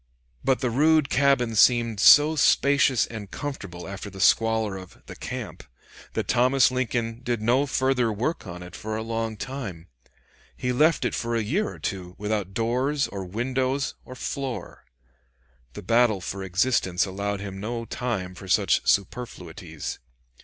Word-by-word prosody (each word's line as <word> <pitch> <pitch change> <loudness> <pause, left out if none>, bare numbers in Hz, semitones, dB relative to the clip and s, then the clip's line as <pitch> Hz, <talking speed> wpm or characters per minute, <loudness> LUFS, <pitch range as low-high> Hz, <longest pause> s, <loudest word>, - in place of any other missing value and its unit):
But 135 -1 +1
the 125 - 0
rude 150 +3 +3
cabin 135 -4 +3
seemed 115 -1 +4
so 150 +7 +7
spacious 140 -3 +4
and 110 -4 -8
comfortable 100 -13 -6
after 100 +1 -7
the 95 0 -11
squalor 110 0 +3
of 95 -1 -10
"the - - -10
camp," 115 -10 -6 0.5
that - - -2
Thomas 130 +1 +4
Lincoln 120 -2 -2
did 120 -2 -1
no 125 +6 +2
further 130 -3 +1
work 120 +6 -2
on 90 0 -7
it 90 - -11
for 110 0 -4
a 110 - -3
long 115 -1 -3
time. 100 -9 -6 0.7
He 125 - -1
left 155 +1 +3
it - - 0
for 115 0 -2
a 115 - 0
year 185 - 0
or - - -10
two 90 -2 -5
without 105 -2 -3
doors, 130 +5 0
or 100 -1 -5
windows, 130 +7 -1
or 130 - -10
floor. 135 -1 -5 0.9
The 105 - -8
battle 115 0 +3
for 95 +2 -5
existence 95 -1 +1
allowed 100 +1 -3
him 95 -1 -7
no 115 +3 -4
time 115 -8 -3
for 95 +1 -11
such - - +3
superfluities. 115 +5 -3
115 Hz, 155 wpm, -25 LUFS, 100-130 Hz, 0.9 s, so